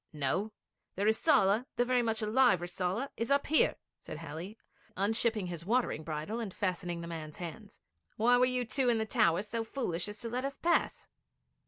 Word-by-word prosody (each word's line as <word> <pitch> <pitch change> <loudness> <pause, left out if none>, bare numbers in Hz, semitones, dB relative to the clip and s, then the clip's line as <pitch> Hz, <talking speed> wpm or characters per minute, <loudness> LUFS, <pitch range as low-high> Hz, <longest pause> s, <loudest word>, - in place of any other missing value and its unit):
'No; 155 +9 -1 0.4
the 195 - -2
Rissala, 220 +1 +3
the 245 - +2
very 250 0 +2
much 225 -2 -1
alive 215 -3 +4
Rissala. 180 +8 -2
It - - -10
is 230 - 0
up 280 0 +3
here,' 315 - +3 0.2
said - - -8
Halley, 165 +6 -7 0.4
unshipping 220 +1 +1
his 170 -2 -4
watering 230 -5 0
bridle, 155 +8 -4
and 220 -5 -4
fastening 180 -3 -2
the 170 - -6
man's 155 -2 -7
hands. 200 +4 -8 0.4
'Why 240 +3 +4
were 250 - +5
you 250 -1 0 0.2
in 235 - +3
the 220 - 0
towers 185 -1 +2
so 230 +1 -2
foolish 215 -8 -3
as 210 0 -8
to 235 - -4
let 250 +2 -2
us 275 0 -3
pass?' 340 0 0
215 Hz, 185 wpm, -32 LUFS, 175-240 Hz, 0.4 s, were